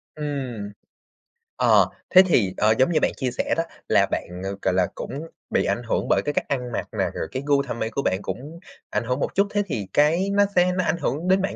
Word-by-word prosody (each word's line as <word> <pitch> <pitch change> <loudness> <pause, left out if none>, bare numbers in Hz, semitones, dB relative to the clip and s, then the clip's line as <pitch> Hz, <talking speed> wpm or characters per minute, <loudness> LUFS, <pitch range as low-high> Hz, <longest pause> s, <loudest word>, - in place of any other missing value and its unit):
Ừm. 130 -9 -4 0.8
Ờ, - - +4 0.2
thế 185 - +9
thì, 105 - +2
ờ, 110 +1 +4
giống 130 +7 +4
như 155 - +3
bạn - - +2
chia 130 -2 -1
sẻ - - -1
đó. 165 - +2 0.2
Là - - +4
bạn, 90 +1 -4
ờ, 95 +1 -3
gọi 95 - +1
là, 90 -1 +2
cũng 150 +4 -6 0.2
bị - - +1
ảnh 115 +5 -1
hưởng 115 - -1
bởi - - +3
cái 145 - -1
cách - - -1
ăn 125 -3 -2
mặc - - -3
nè, - - +1
rồi - - -4
cái 130 +1 -4
gu 140 -1 +3
thẩm 120 -3 -5
mỹ 110 - -1
của 140 - -2
bạn 95 -7 0
cũng 150 +11 -6 0.3
ảnh - - -1
hưởng 125 +3 -1
một - - -2
chút, 200 +1 +3
thế 205 0 0
thì 110 - -3
cái 165 +6 +3
nó 205 0 +4
sẽ 180 0 +4
nó 185 - +2
ảnh 170 +1 0
hưởng 160 +2 -2
đến 190 +1 +4
bạn 195 - -2
140 Hz, 250 wpm, -24 LUFS, 115-165 Hz, 0.8 s, thế